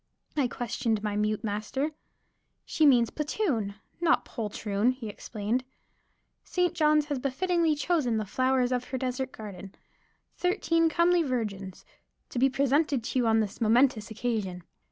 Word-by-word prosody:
I 285 -4 +2
questioned 235 -3 -2
my 210 -1 -1
mute 210 +1 0
master. 220 +8 -2 0.7
"She 310 -2 +3
means 240 -4 +5
'Platoon,' 290 - -1 0.2
not 340 -2 +3
'poultroon,'" 210 0 -1
he 245 -4 -7
explained 215 +4 -3 0.8
"St. 360 -2 0
Johns 305 -1 +3
has 290 -3 -2
befittingly 325 +4 +1
chosen 290 -6 +1
the 215 - -1
flowers 255 +3 +1
of 250 0 0
her 260 - -4
desert 260 +1 -2
garden 195 -3 -9 0.6
thirteen 330 -3 +2
comely 340 +2 +3
virgins 210 - -3 0.4
to 245 - -3
be 270 +2 +5
presented 275 0 +1
to 255 - -1
you 240 - +2
on 225 0 +4
this 210 +2 -5
momentous 230 0 +3
occasion. 215 -6 -3
250 Hz, 140 wpm, -28 LUFS, 215-295 Hz, 0.8 s, means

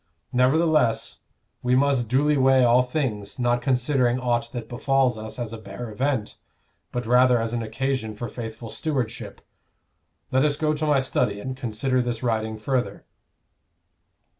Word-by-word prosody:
Nevertheless 140 0 +2 0.4
we 125 0 +2
must 135 -3 +2
duly 145 +4 +3
weigh 135 -1 +4
all 120 +1 +5
things, 125 -7 -3
not 120 -1 +1
considering 125 -1 +1
aught 120 -2 -1
that 120 -3 -6
befalls 130 0 +1
us 110 0 -7
as 120 -3 -4
a 115 - -6
bare 110 +2 -8
event, 130 -1 -2 0.5
but 120 -1 -3
rather 125 +1 +5
as 115 0 -2
an 120 - -1
occasion 115 0 -2
for 120 +3 -5
faithful 115 0 -7
stewardship. 130 -7 -3 0.9
Let 130 +1 +3
us 150 -1 +2
go 155 0 0
to 155 0 -2
my 145 -2 +4
study 120 -5 0
and 130 +5 -5
consider 130 +1 -1
this 120 -1 -3
writing 110 -2 -1
further." 125 +3 -2
125 Hz, 150 wpm, -24 LUFS, 115-135 Hz, 0.9 s, all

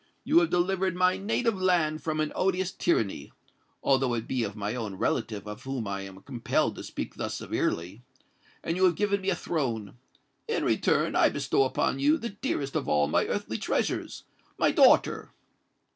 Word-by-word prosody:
You 320 +3 +5
have 340 - +1
delivered 185 +1 +1
my 185 0 +3
native 215 0 -1
land 170 -4 +2
from 155 -1 -2
an 155 -1 0
odious 190 -1 0
tyranny—although 130 - -1
it 115 -1 -4
be 130 -3 -1
of 105 -2 -4
my 105 0 -3
own 110 -5 -4
relative 105 +1 -2
of 105 0 -7
whom 130 -5 -4
I 100 0 -3
am 95 0 -10
compelled 120 -4 -1
to - - -6
speak - - -5
thus - - -3
severely; 90 +7 -2 0.6
and 165 - -1
you 190 - +4
have 175 -2 +3
given 200 +1 0
me 190 - -1
a 185 - +2
throne. 120 - -3 0.5
In 455 - -1
return - - +1
I - - +5
bestow 410 - +1
upon - - 0
you 300 +3 +4
the 235 -6 -4
dearest 195 - -3
of - - -1
all 75 -1 +3
my - - +1
earthly - - -3
treasures—my - - -2
daughter!" - - +4
155 Hz, 175 wpm, -28 LUFS, -, 0.6 s, You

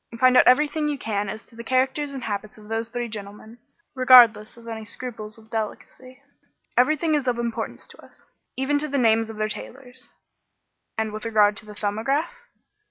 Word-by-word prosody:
Find 255 0 +5
out - - +6
everything 300 +3 +3
you 290 - -2
can 205 -5 -2
as 215 +3 -7
to - - -18
the 235 - -8
characters 265 +4 0
and 270 -3 -7
habits 210 -1 -5
of 210 0 -15
those 225 0 -2
three 240 0 -3
gentlemen, 215 +2 -9 0.3
regardless 240 -5 +6
of 235 0 -14
all 225 -1 -6
scruples 215 -1 -7
of 220 0 -19
delicacy. 250 +3 -6 0.6
Everything 310 +5 +2
is 290 -3 0
of 245 -1 +1
importance 235 -1 -4
to - - -16
us, - - -17 0.3
even 280 +2 +1
to 305 - -1
the 280 -1 -2
names 225 -2 +3
of 220 - -8
their 215 0 0
tailors." 250 +3 -8 0.9
"And 220 -1 -1
with 215 - -6
regard 210 -2 +3
to 215 - -10
the 210 - -10
'Thumbograph'?" 225 - -1
235 Hz, 185 wpm, -24 LUFS, 215-260 Hz, 0.9 s, out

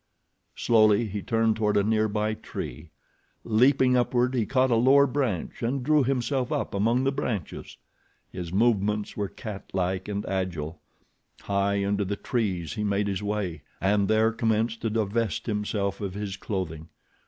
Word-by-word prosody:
Slowly 110 -1 +4
he 105 -1 -4
turned 115 0 +1
toward 105 -2 +1
a 100 - +3
nearby 110 0 +1
tree. 80 -6 -7 0.5
Leaping 125 +3 +4
upward 125 +1 +2
he 115 -4 0
caught 130 -1 +2
a - - +4
lower 135 +4 +6
branch 130 - -2
and 125 +3 -1
drew 150 +1 +4
himself 130 0 -1
up - - -2
among 115 +6 +2
the 135 - +2
branches. 120 - -4 0.5
His 85 -2 -6
movements 105 0 +1
were 100 -1 -2
cat 105 -3 -8
like 95 0 -1
and 105 0 -3
agile. 85 -4 -3 0.6
High 100 0 0
into 100 +1 0
the 100 +1 -2
trees 95 - -2
he 105 - -3
made 100 0 0
his 100 -1 -2
way 100 -6 -3 0.2
and 100 +1 +2
there 110 +1 +3
commenced 115 0 0
to 115 - 0
divest 110 -3 -1
himself 105 -2 -2
of 100 -2 -4
his 100 -2 -4
clothing. 85 -6 -4
105 Hz, 155 wpm, -26 LUFS, 100-115 Hz, 0.6 s, lower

